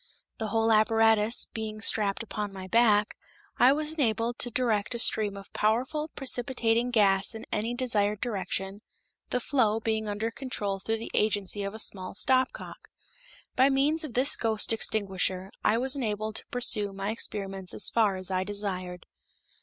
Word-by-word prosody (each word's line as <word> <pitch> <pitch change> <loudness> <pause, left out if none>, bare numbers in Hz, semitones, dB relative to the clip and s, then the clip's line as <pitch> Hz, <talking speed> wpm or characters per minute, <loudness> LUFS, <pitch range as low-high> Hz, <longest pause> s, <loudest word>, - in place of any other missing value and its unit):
The 220 - -2
whole 225 +1 +1
apparatus 225 0 +3
being 215 -1 -5
strapped 210 -1 +1
upon 210 -2 -5
my 190 -1 -8
back, 215 -1 +3 0.4
I 250 - +7
was 305 +2 -1
enabled 235 -5 -1
to 245 - +2
direct 235 -2 0
a - - -1
stream 210 -3 +3
of 195 - -12
powerful 255 +8 0
precipitating 245 -2 0
gas 200 -3 +3
in 220 - -8
any 230 +3 -2
desired 210 -5 0
direction, 195 -2 -3 0.5
the 250 - 0
flow 230 -4 +1
being 220 -1 -2
under 215 +3 -2
control 210 -6 -4
through 225 +3 -2
the 225 - -7
agency 205 -1 +1
of 200 +2 -5
a - - -6
small 190 -4 -4
stopcock. 255 +4 0 0.7
By 265 +2 +5
means 290 +4 +2
of 285 -7 -7
this 260 +3 +2
ghost 225 -1 +1
extinguisher 190 -3 -1
I 215 - +3
was 260 +3 +2
enabled 215 -4 -2
to - - -8
pursue 215 -5 +1
my 195 +2 -3
experiments 195 -4 -2
as - - +3
far 215 -4 +2
as 185 0 0
I 185 0 0
desired. 185 -3 -5
220 Hz, 160 wpm, -28 LUFS, 200-240 Hz, 0.7 s, I